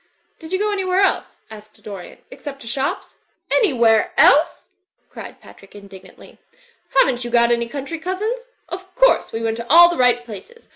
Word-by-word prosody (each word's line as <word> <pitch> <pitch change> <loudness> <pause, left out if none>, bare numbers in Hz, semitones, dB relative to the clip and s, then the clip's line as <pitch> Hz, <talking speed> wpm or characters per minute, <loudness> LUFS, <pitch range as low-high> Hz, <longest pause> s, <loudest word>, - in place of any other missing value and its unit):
"Did 320 0 -12
you 375 - 0
go 420 +2 -1
an3nvhere 380 0 0
else/' - - -2
asked 215 0 -15
Dorian, 195 -4 -10
"except 285 - -9
to 230 - -12
shops?'' 265 +4 -4 0.3
"Anywhere 235 - +2
else!" 295 +4 +3 0.4
cried - - -11
Patrick, 195 +1 -18
Indignantly, 200 -2 -15 0.6
"haven't 255 -2 +3
you 240 - -5
got 235 0 +3
any 235 0 0
country 285 +4 -6
cousins? 430 +8 -4 0.2
Of 375 +1 -10
course - - +3
we 225 0 -5
went 225 0 -2
to 235 0 -8
all 345 +3 +8
the 345 - -4
right 245 -1 +2
places. 245 - -13
270 Hz, 165 wpm, -19 LUFS, 230-370 Hz, 0.6 s, all